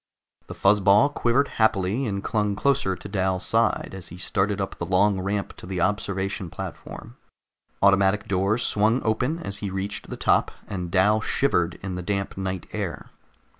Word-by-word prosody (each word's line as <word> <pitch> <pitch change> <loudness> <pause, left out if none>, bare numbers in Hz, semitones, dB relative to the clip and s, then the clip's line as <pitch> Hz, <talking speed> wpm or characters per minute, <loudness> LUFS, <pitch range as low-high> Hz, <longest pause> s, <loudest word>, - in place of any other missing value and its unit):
The - - -8
fuzz 105 +2 +4
ball 100 +7 +5
quivered 140 0 +1
happily 110 +3 +2
and 100 -2 -3
clung 105 -2 0
closer 135 -5 +1
to - - -9
Dal's 95 -2 -1
side 115 0 +1
as 95 -3 -7
he 85 - -10
started 100 +2 -1
up 95 - -3
the - - -2
long 95 +2 +3
ramp 100 +1 -3
to - - -10
the 95 -1 -3
observation 100 -1 -1
platform. - - -8 0.7
Automatic 100 +1 +4
doors 100 +5 +1
swung 110 +4 +2
open 125 +8 0
as 100 -13 -2
he 100 -1 -4
reached 95 +2 -4
the - - -6
top, - - +2 0.2
and 90 -3 -4
Dal 105 +4 +3
shivered 90 -10 +1
in 95 -2 -4
the 90 - -4
damp 100 +1 -2
night 95 -1 -4
air. - - -5
100 Hz, 170 wpm, -25 LUFS, 95-110 Hz, 0.7 s, ball